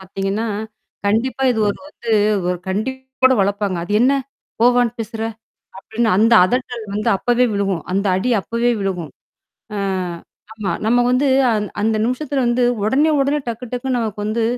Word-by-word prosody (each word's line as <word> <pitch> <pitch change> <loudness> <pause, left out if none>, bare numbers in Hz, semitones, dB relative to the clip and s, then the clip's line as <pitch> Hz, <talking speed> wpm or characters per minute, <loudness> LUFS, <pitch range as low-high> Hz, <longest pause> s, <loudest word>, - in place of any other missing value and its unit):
பாத்தீங்கன்னா, 195 +3 -3 0.6
கண்டிப்பா 235 +6 0
இது 235 - 0
ஒரு 200 - -1 0.3
வந்து 220 - +4 0.3
ஒரு 180 - -2
கண்டிப்போட 260 +5 0
வளப்பாங்க. 200 -1 0
"அது 205 - -5
என்னா? 265 +3 +4 0.4
போ, 235 - +5
வான்னு 245 -2 +2
பேசுற?" 225 0 -5 0.6
அப்படின்னு, 220 +4 -1
அந்த 225 +3 +4
அதட்டல் 245 0 -2
வந்து 210 +1 0
அப்பவே 245 +4 +2
விழுகும், 195 -4 -1
அந்த 195 +2 0
அடி 205 +7 0
அப்பவே 235 +4 0
விழுகும். 180 -5 -3 0.6
அ - - -3 0.8
ஆமா. 210 -5 -3
நம்ம 240 +2 +3
வந்து, 260 +3 +2 0.2
அ - - +3 0.3
அந்த 220 +1 +1
நிமிஷத்தில 265 +2 -1
வந்து 240 +1 +2 0.2
உடனே 280 +9 +3
உடனே, 280 +2 +1
டக்கு 235 +1 -4
டக்குன்னு 250 +1 -1
நமக்கு 215 -3 -3
வந்து 225 +2 0
225 Hz, 150 wpm, -19 LUFS, 205-250 Hz, 0.8 s, போ